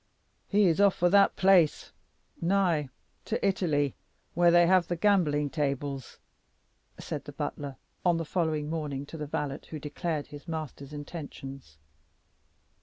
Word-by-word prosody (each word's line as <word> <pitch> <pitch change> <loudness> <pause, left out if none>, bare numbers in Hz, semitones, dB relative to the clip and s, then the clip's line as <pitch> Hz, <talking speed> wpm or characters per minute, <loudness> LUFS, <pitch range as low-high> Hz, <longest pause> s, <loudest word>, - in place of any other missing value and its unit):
"He 205 0 +3
is 170 +1 +3
off 200 -2 +5
for 175 0 +2
that 200 0 +5
place 185 -5 +4 0.5
nigh 170 -5 +2 0.4
to - - 0
Italy 155 -7 +1 0.4
where 175 +1 +4
they 175 0 +6
have 185 0 +4
the 175 - -1
gambling 165 -7 +2
tables," 140 -3 -3 0.8
said - - -5
the - - -7
butler, 140 -2 -5 0.3
on 175 -2 +3
the 165 - -3
following 155 -3 -1
morning, 150 -3 -3
to 160 - -9
the 150 -1 -5
valet 145 -2 -3
who 155 - -5
declared 150 +1 -3
his 145 +3 -12
master's 155 -3 -6
intentions. 140 - -8
160 Hz, 140 wpm, -29 LUFS, 145-175 Hz, 0.8 s, they